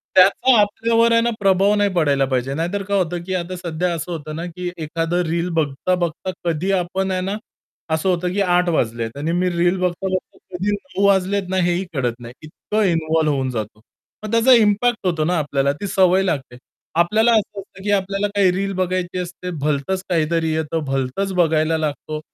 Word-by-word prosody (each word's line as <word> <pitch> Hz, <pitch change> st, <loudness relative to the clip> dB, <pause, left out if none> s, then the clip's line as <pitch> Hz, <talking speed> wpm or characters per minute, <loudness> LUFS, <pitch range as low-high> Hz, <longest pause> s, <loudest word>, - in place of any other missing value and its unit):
त्याचा 200 Hz, +6 st, +5 dB
आपल्यावर 230 Hz, +3 st, +2 dB
आहे 230 Hz, -, +5 dB
ना 235 Hz, -, +1 dB
प्रभाव 195 Hz, +1 st, +3 dB
नाही 205 Hz, -1 st, +2 dB
पडायला 145 Hz, -5 st, +2 dB
पाहिजे. 130 Hz, 0 st, -1 dB
नाहीतर 175 Hz, +6 st, -2 dB
काय 200 Hz, +1 st, 0 dB
होतं 175 Hz, -2 st, -1 dB
की 185 Hz, -, -3 dB
आता 180 Hz, +1 st, -3 dB
सध्या 175 Hz, 0 st, -2 dB
असं 165 Hz, +2 st, -5 dB
होतं 155 Hz, -2 st, -5 dB
ना, 170 Hz, +2 st, -4 dB
की 175 Hz, +1 st, -5 dB
एखादं 165 Hz, +2 st, -1 dB
रील 170 Hz, +2 st, -1 dB
बघता, 150 Hz, +5 st, 0 dB
बघता 175 Hz, +1 st, -3 dB
कधी 170 Hz, +4 st, 0 dB
आपण 190 Hz, +1 st, -1 dB
आहे 185 Hz, 0 st, -1 dB
ना 195 Hz, +3 st, -2 dB, 0.6 s
असं 160 Hz, +4 st, 0 dB
होतं 180 Hz, 0 st, 0 dB
की 200 Hz, -, 0 dB
8:00 180 Hz, -1 st, +2 dB
वाजलेत 115 Hz, -4 st, -1 dB
आणि 155 Hz, +3 st, -2 dB
मी 180 Hz, +1 st, +1 dB
रील 175 Hz, +2 st, +1 dB
बघता-बघता 185 Hz, +1 st, -2 dB, 0.2 s
कधी 195 Hz, +4 st, -1 dB
9:00 205 Hz, -1 st, -2 dB
वाजलेत 195 Hz, 0 st, +2 dB
ना 190 Hz, -, -1 dB
हेही 175 Hz, +1 st, 0 dB
कळत 125 Hz, -4 st, 0 dB
नाही. 120 Hz, 0 st, -10 dB
इतकं 210 Hz, +7 st, -2 dB
इन्व्हॉल्व 160 Hz, -3 st, +1 dB
होऊन 130 Hz, -2 st, -1 dB
जातो. 110 Hz, -2 st, -5 dB, 0.4 s
मग 215 Hz, -, -5 dB
त्याचा 230 Hz, +3 st, +5 dB
इम्पॅक्ट 215 Hz, +1 st, +1 dB
होतो 160 Hz, -3 st, 0 dB
ना 175 Hz, +1 st, +1 dB
आपल्याला 140 Hz, -2 st, 0 dB
ती 200 Hz, -, -2 dB
सवय 190 Hz, 0 st, +3 dB
लागते. 135 Hz, -9 st, -3 dB, 0.4 s
आपल्याला 215 Hz, +8 st, +3 dB
असं 210 Hz, -2 st, 0 dB
असतं 190 Hz, 0 st, -12 dB
की 205 Hz, -, 0 dB
आपल्याला 195 Hz, +1 st, 0 dB
काही 190 Hz, -3 st, +4 dB
रील 195 Hz, +1 st, -2 dB
बघायची 185 Hz, -1 st, -2 dB
असते 180 Hz, 0 st, -6 dB
भलतंच 150 Hz, +6 st, -1 dB
काहीतरी 165 Hz, -1 st, +1 dB
येतं, 160 Hz, 0 st, -2 dB
भलतंच 135 Hz, +9 st, -2 dB
बघायला 160 Hz, -2 st, +2 dB
लागतो. 155 Hz, 0 st, -3 dB
180 Hz, 190 wpm, -20 LUFS, 155-195 Hz, 0.6 s, त्याचा